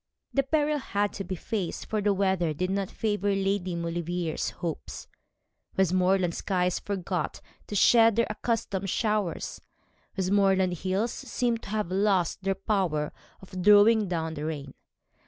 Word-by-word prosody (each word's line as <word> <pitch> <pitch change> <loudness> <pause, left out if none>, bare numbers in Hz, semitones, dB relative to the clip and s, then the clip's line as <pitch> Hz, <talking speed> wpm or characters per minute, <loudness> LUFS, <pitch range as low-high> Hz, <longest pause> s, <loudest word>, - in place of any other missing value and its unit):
The 275 - +3
peril 295 +2 +1
had 205 -5 -1
to 195 - -4
be 190 0 -4
faced, 190 0 -3
for 215 -1 -1
the 205 0 +2
weather 190 -5 +1
did 185 +4 -1
not 195 -1 -1
favour 205 -2 0
Lady 195 -2 -1
Maulevrier's 170 0 -2
hopes. 170 -3 -6 0.7
Westmoreland 185 -1 +2
skies 180 -1 0
forgot 185 -5 -3 0.3
to 205 - -5
shed 225 +1 +6
their 230 0 +3
accustomed 210 -3 -2
showers. 210 -4 -1 0.6
Westmoreland 190 -1 +3
hills 195 +5 -1
seemed 235 -2 -2
to - - -10
have 210 -4 -2
lost 195 -2 +1
their 195 0 0
power 185 -7 -1 0.3
of 185 -1 -7
drawing 210 +2 +6
down 160 -2 -2
the 150 -1 -5
rain. 145 -4 -5
195 Hz, 140 wpm, -27 LUFS, 180-210 Hz, 0.7 s, shed